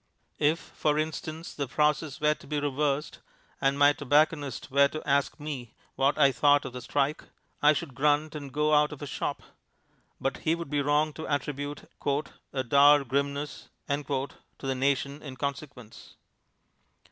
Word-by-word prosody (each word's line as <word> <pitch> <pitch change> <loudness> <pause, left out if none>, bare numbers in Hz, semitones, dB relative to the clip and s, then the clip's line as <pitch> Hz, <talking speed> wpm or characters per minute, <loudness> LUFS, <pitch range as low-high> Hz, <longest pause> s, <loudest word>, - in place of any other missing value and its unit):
If, 150 +3 +3
for 150 -1 -1
instance, 160 +1 -4
the 140 -2 -3
process 150 +1 0
were 150 0 +3
to - - -16
be 150 0 -1
reversed, 145 +1 -1 0.4
and 135 +1 +2
my 145 0 +6
tobacconist 145 -2 +1
were 140 +1 +5
to 155 +2 -7
ask 140 +1 +1
me 135 -6 -6 0.2
what 135 +2 +2
I 140 -2 +5
thought 145 +3 +4
of 130 - -6
the 125 - -6
strike, 145 +4 -1 0.4
I 150 +1 +6
should 150 -2 -4
grunt 150 +3 +2
and 145 -3 -7
go 150 +3 +1
out 150 0 +4
of 150 - -9
his 145 - -5
shop; - - -3 0.8
but 135 -1 -1
he 160 +1 +1
would 170 -4 -7
be 145 -1 +1
wrong 150 +2 +2
to 160 - -7
attribute 145 0 -3 0.6
"a 130 -1 -1
dour 140 +3 +6
grimness" 140 +2 -2 0.2
to 140 -1 -1 0.3
the 135 -1 -2
nation 140 +2 0
in 135 -3 -8
consequence. 140 -5 -6
145 Hz, 160 wpm, -28 LUFS, 140-150 Hz, 0.8 s, my